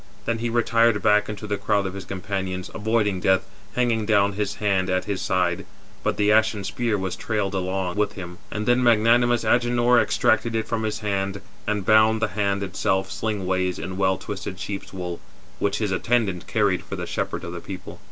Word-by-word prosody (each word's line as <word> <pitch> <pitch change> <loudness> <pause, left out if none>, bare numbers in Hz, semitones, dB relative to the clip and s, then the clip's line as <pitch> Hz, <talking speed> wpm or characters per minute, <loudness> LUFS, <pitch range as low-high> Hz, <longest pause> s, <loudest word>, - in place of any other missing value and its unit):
Then 115 -1 -1
he 120 +1 -1
retired 115 -1 +3
back 105 -1 +4
into 105 0 -6
the 105 -1 -1
crowd 100 0 +1
of 95 - -3
his 100 -1 -7
companions, 95 -1 -4
avoiding 105 -3 +1
death, 95 0 +3 0.3
hanging 115 -4 +1
down 100 -2 +3
his 100 0 -2
hand 95 -3 +1
at 95 0 0
his 100 -2 -2
side, 90 -2 0 0.4
but - - 0
the 105 0 +3
ashen 110 -1 +3
spear 110 +2 -1
was 95 -2 -3
trailed 105 -3 -2
along 95 0 -2
with 105 - +1
him. 90 -2 -8
And 105 0 -3
then 120 +2 +3
magnanimous 120 +1 +4
Agenor 120 0 +3
extracted 115 +1 +1
it 110 - -1
from 115 -1 -1
his 110 0 -2
hand, 100 -1 -1 0.3
and 105 -2 -1
bound 110 +1 +5
[the - - 0
hand] 100 +1 0
itself 95 0 -1
sling 105 -2 -2
ways 95 -1 0
in 95 +3 -5
well 95 0 +2
twisted 100 -1 -6
sheep's 100 -1 -5
wool, 90 -2 -5 0.4
which 100 0 0
his 105 -3 -1
attendant 100 -2 0
carried 100 -4 +1
for - - -6
the - - -4
shepherd - - -3
of 85 - -6
the 85 - -5
people. 95 -1 -8
100 Hz, 195 wpm, -24 LUFS, 95-110 Hz, 0.4 s, bound